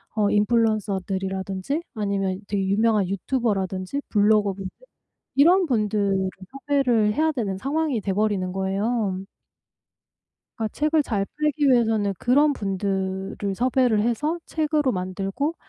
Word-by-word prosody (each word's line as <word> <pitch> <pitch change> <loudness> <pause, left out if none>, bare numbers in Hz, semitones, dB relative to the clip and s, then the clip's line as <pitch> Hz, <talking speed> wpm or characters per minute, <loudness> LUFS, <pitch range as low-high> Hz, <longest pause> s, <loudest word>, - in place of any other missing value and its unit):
어 205 -1 +2
인플루언서들이라든지 200 - 0
아니면 195 -2 -1
되게 195 -2 0
유명한 210 -1 +2
유튜버라든지 195 +1 -2
블로거분들 205 -2 +2 0.7
이런 350 +6 +5
분들을 205 -5 0 0.4
섭외를 240 -7 +3
해야 315 +1 +2
되는 200 -8 -3
상황이 285 -1 -1
돼 195 -1 -2
버리는 195 -3 0
거예요. 195 +1 -1 1.4
그러니까 220 -2 -2
책을 305 +1 +2
잘 200 -6 -1
팔기 300 -1 +1
위해서는 225 -5 +3
그런 290 +4 +3
분들을 195 -1 -2
섭외를 245 -2 +2
해서 295 +9 0
책으로 300 -4 0
만들고 195 - -2
210 Hz, 310 characters per minute, -24 LUFS, 195-260 Hz, 1.4 s, 이런